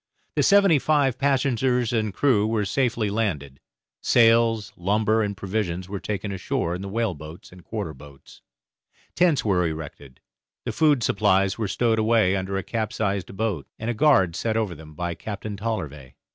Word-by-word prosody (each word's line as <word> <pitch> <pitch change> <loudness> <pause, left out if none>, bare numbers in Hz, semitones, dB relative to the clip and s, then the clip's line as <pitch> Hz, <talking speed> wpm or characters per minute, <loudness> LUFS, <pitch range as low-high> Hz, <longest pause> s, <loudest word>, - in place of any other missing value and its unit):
The - - +2
seventy 195 -6 +5
five 135 -4 +1
passengers 130 -3 +1
and 110 -2 0
crew 110 -2 +2
were 110 -2 0
safely 115 -3 0
landed; 75 -11 -2 0.4
sails, 115 -3 +3
lumber, 105 +4 +1
and 100 -2 -2
provisions 95 -2 -3
were 100 0 -5
taken 105 0 -4
ashore 90 -2 -2
in 90 - -5
the 100 - -6
whaleboats 90 -8 -4
and 90 -1 -15
quarter 100 -7 -5
boats; 70 0 -16 0.7
tents 170 -8 +2
were 90 -4 +2
erected; 75 -4 -8 0.5
the - - -2
food 150 -6 +3
supplies 100 -1 +2
were 110 - -1
stowed 115 +2 +1
away 110 -4 +3
under 95 0 -2
a 95 - -3
capsized 100 -4 -3
boat, 105 -9 -2
and 110 +2 -2
a - - -2
guard 105 - +3
set 110 +3 -1
over 110 -5 -1
them 75 -1 -13
by 85 +1 -3
Captain 105 +3 -6
Tollervey. 85 - -5
105 Hz, 160 wpm, -24 LUFS, 90-115 Hz, 0.7 s, seventy